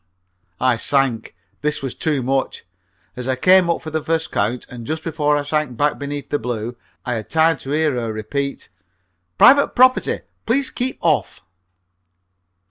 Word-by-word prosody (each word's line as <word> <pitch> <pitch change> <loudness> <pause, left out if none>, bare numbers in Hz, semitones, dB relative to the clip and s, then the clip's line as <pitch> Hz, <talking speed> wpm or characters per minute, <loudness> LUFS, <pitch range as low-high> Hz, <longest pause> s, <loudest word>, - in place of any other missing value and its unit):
I 130 -2 +2
sank. 130 -3 0 0.3
This 150 -1 -1
was 135 - -3
too 150 -5 -1
much. 135 +1 -1 0.5
As 125 0 -6
I 130 - +1
came 180 +6 +5
up 170 - -1
for 155 - -6
the 160 0 -1
first 160 0 -1
count, 115 +5 -1
and 120 -2 -10
just 160 0 -3
before 150 -3 0
I 145 - -2
sank 145 -4 -2
back 145 +3 +1
beneath 145 0 -6
the 145 - 0
blue, 120 0 -4 0.3
I 125 - -1
had 110 -2 -5
time 160 -1 +3
to 135 - -9
hear 150 0 +1
her 115 -3 -2
repeat: 140 +6 -4 0.7
"Private 280 - +6
property! 255 +1 +3 0.3
Please 270 +4 +2
keep 255 +1 -1
off!" - - 0
145 Hz, 165 wpm, -20 LUFS, 125-160 Hz, 0.7 s, Private